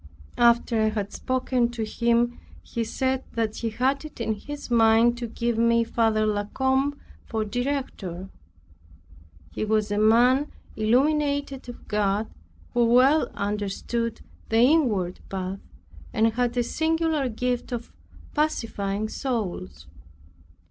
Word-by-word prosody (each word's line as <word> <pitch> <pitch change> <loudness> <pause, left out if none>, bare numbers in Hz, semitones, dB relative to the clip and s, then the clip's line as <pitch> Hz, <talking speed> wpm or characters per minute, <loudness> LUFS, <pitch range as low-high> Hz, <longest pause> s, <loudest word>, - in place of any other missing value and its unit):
After 235 -1 +4
I 220 - +3
had 210 -2 -3
spoken 255 -2 0
to 230 -2 -3
him, 235 +2 +1 0.2
he 230 - -3
said 260 +3 -1
that 225 -2 -1
he 230 - -2
had 265 +6 0
it 305 -4 -10
in 225 -1 0
his 290 +5 -8
mind 230 +1 +5
to 240 - -3
give 235 0 -2
me 235 0 +4
Father 225 -1 +1
La 205 -1 0
Combe 265 +5 0 0.2
for 220 -2 -2
director; 220 -7 -3 1.2
he - - -3
was 215 -1 +1
a 205 - +1
man 245 +6 +4 0.2
illuminated 280 +3 +1
of 245 - -11
God, 210 +1 0 0.4
who 240 - +3
well 255 +6 +4
understood 210 +3 -2 0.3
the 225 - +2
inward 235 - +3
path, 190 0 -4 0.5
and 225 +1 +2
had 245 +1 0
a 245 - +3
singular 320 0 0
gift 245 +2 -2
of 240 -1 -5 0.4
pacifying 215 -9 -1
souls. 185 - -4
235 Hz, 125 wpm, -25 LUFS, 215-260 Hz, 1.2 s, mind